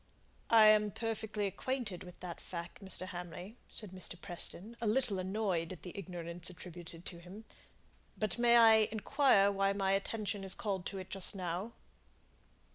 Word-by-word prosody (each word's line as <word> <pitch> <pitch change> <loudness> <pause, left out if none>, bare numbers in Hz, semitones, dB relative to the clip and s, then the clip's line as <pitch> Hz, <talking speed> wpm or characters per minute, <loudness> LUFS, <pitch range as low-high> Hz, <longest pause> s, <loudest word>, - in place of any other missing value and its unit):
"I 225 -1 +8
am 215 0 +6
perfectly 220 -1 -2
acquainted 215 -1 -3
with 180 -1 -12
that 180 -2 -6
fact, 170 +2 -7
Mr. 185 -1 -4
Hamley," 180 +4 -7
said 210 -4 -8
Mr. 185 -1 -4
Preston, 195 +4 -2
a 230 - 0
little 215 -3 +1
annoyed 185 -3 -1
at 180 - -9
the 180 - -8
ignorance 175 -2 -3
attributed 175 -1 -10
to 170 - -7
him. 190 +6 -11 0.7
"But 215 +1 -1
may 240 0 +6
I 225 -1 +8 0.2
inquire 220 -2 +4
why 195 0 +2
my 195 -1 +1
attention 205 0 -1
is 190 -1 +2
called 195 -4 -2
to 195 - -5
it 185 -1 -7
just 195 +1 0
now?" 185 +4 -3
195 Hz, 160 wpm, -34 LUFS, 180-215 Hz, 0.7 s, I